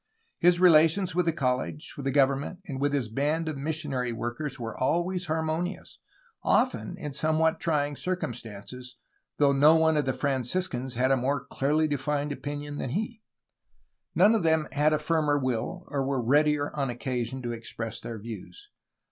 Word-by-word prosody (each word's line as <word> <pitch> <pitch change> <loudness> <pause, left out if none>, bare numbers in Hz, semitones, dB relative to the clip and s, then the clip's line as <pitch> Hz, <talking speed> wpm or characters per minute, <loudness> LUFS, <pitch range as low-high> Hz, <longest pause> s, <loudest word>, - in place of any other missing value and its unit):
His 175 0 +5
relations 175 +1 +5
with 180 0 +1
the - - +4
college, 130 0 -2
with 140 - -7
the 135 - +1
government, 140 +6 +1
and 135 -6 -5
with 145 0 +2
his 140 -5 0
band 150 +8 -1
of 155 - -2
missionary 140 -4 -2
workers 120 +5 -4
were 115 -2 -5
always 175 +6 0
harmonious, 160 +3 -3 0.4
often 245 -7 +1
in 150 -6 -5
somewhat 160 +2 +2
trying 145 -3 0
circumstances, 125 - -5 0.4
though 145 -1 +4
no 150 +4 +6
one 160 -1 +3
of 145 - +1
the 130 - +1
Franciscans 130 0 -2
had 130 +2 +3
more 135 +2 -1
clearly 150 +3 +1
defined 145 +1 -1
opinions 145 0 -5
than - - -3
he. 215 - -3 0.9
None 205 +4 +6
of 225 - +2
them 160 -2 +2
had 150 +1 +3
a 155 - +3
firmer 150 -1 +1
will, 130 +7 -2
or 140 -2 -1
were 135 0 -1
readier 145 +4 +2
on 140 -2 0
occa 125 0 -2
sion 130 +2 -6
to 120 - -2
express 115 -1 -6
their 115 - -6
views. 115 - -10
145 Hz, 165 wpm, -27 LUFS, 130-160 Hz, 0.9 s, no